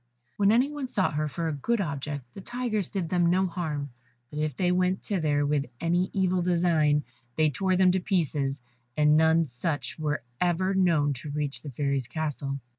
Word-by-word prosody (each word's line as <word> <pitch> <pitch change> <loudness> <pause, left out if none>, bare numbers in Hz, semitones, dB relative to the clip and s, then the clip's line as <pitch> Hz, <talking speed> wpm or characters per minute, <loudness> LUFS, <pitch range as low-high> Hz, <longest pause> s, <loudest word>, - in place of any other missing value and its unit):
When 200 0 +4
any 250 +6 +3
one 290 -3 -4
sought 190 -9 0
her 155 +1 0
for 165 +3 -3
a 160 - -1
good 230 - 0
object, 140 -6 -4
the 195 - -9
tigers 220 -4 -2
did 185 -5 -3
them 175 -1 +2
no 185 +2 +3
harm, 155 -6 -3 0.4
but 150 - -5
if 150 -4 -2
they 180 -1 +2
went 185 +1 +1
thither 150 -7 +1
with 145 -1 0
any 175 +2 +1
evil 185 -1 +1
design, 170 -4 +2 0.3
they 155 -1 +3
tore 190 +5 +1
them 185 0 +5
to 190 - +1
pieces, 145 - -1 0.4
and 150 0 +5
none 160 +1 +4
such 145 +5 -4
were 150 -4 -1 0.2
ever 180 +2 +1
known 165 -7 +3
to 150 - -7
reach 145 -1 -3
the 150 - -7
Fairy's 140 -1 -1
castle. 145 -2 -3
165 Hz, 190 wpm, -27 LUFS, 145-185 Hz, 0.4 s, them